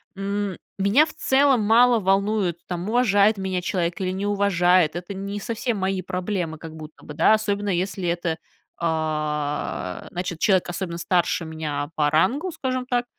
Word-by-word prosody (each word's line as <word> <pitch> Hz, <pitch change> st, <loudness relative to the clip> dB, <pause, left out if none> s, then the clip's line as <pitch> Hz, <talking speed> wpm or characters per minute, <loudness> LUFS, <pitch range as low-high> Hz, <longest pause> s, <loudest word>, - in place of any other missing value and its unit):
м, 200 Hz, -1 st, -3 dB, 0.2 s
меня 210 Hz, +11 st, +5 dB
в -, -, -10 dB
целом 265 Hz, -3 st, +3 dB
мало 235 Hz, +2 st, +5 dB
волнует, 195 Hz, -2 st, +1 dB
там 180 Hz, +3 st, -4 dB
уважает 215 Hz, -3 st, +3 dB
меня 190 Hz, -1 st, -2 dB
человек 175 Hz, 0 st, -2 dB
или 185 Hz, 0 st, -1 dB
не 195 Hz, +2 st, -3 dB
уважает, 180 Hz, -5 st, +3 dB
это 180 Hz, +3 st, -5 dB
не 200 Hz, +1 st, -5 dB
совсем 230 Hz, +1 st, -2 dB
мои 190 Hz, 0 st, -1 dB
проблемы 180 Hz, -3 st, -3 dB
как 160 Hz, 0 st, -10 dB
будто 155 Hz, 0 st, -11 dB
бы, 150 Hz, -, -8 dB
да 165 Hz, +7 st, +4 dB
особенно, 205 Hz, -1 st, 0 dB
если 185 Hz, 0 st, -1 dB
это, 170 Hz, -1 st, -1 dB, 0.4 s
а, 150 Hz, -, -2 dB
значит, 175 Hz, -2 st, -4 dB
человек 190 Hz, -4 st, +3 dB
особенно 175 Hz, -2 st, -4 dB
старше 175 Hz, -1 st, 0 dB
меня 150 Hz, -2 st, -4 dB
по 150 Hz, -1 st, +2 dB
рангу, 250 Hz, -, +1 dB
скажем 255 Hz, -4 st, -3 dB
так, 245 Hz, -1 st, 0 dB
190 Hz, 160 wpm, -23 LUFS, 170-205 Hz, 0.4 s, меня